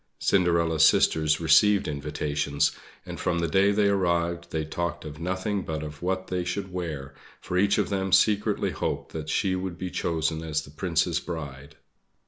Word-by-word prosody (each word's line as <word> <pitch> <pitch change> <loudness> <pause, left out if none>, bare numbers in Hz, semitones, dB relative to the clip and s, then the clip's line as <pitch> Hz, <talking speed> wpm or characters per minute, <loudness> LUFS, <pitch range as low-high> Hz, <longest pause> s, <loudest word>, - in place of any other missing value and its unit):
Cinderella's 85 -4 +2
sisters 75 -1 +4
received 90 +6 +4
invitations; 75 0 -1 0.3
and - - -7
from 85 - 0
the 85 0 0
day 95 +4 +3
they 100 0 +2
arrived 85 -3 0
they 80 -1 -2
talked 85 +1 -4
of 75 0 -8
nothing 95 +4 -2
but 80 -3 -4
of 75 0 -8
what 95 +1 -1
they 90 -1 -2
should 95 +1 -4
wear, 75 -6 -5 0.3
for 90 - -5
each 100 +2 +3
of - - 0
them 95 -1 -1
secretly 105 +1 +3
hoped - - -3
that 80 -1 -5
she 95 +1 +1
would 95 -2 -4
be 90 -1 -5
chosen 80 -1 -1
as 75 -2 -2
the 70 - -13
Prince's 80 +1 0
bride. 70 -5 -7
85 Hz, 170 wpm, -26 LUFS, 75-95 Hz, 0.3 s, sisters